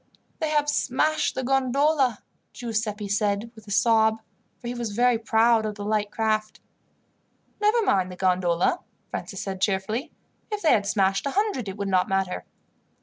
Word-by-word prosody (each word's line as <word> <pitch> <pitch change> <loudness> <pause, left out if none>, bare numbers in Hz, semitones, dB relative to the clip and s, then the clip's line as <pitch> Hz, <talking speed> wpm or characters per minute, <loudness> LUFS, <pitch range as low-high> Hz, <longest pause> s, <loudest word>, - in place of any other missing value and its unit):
"They 315 -2 -1
have 295 -1 +1
smashed 300 +2 +1
the 260 - -2
gondola," 270 -1 +2 0.3
Giuseppi 220 -3 -3
said 205 +2 0
with 220 -2 -16
a - - -8
sob, 220 +1 +3 0.4
for 240 - -9
he 240 - -2
was 235 -4 -4
very 240 +1 +3
proud 225 0 +3
of 215 -1 -3
the 205 -1 -6
light 210 -1 0
craft. 215 -1 -1 1.0
"Never 435 +2 +3
mind 190 - +1
the - - -8
gondola," 180 - +1 0.3
Francis 195 - -5
said 190 -1 -5
cheerfully. 215 +9 -1 0.4
"If 420 -1 -3
they 320 - +5
had 200 -2 +1
smashed 195 +3 +1
a 280 - -4
hundred 405 - 0
it 190 - -7
would 200 -1 -3
not 185 -2 +2
matter." 195 -1 -1
220 Hz, 165 wpm, -25 LUFS, 200-260 Hz, 1.0 s, they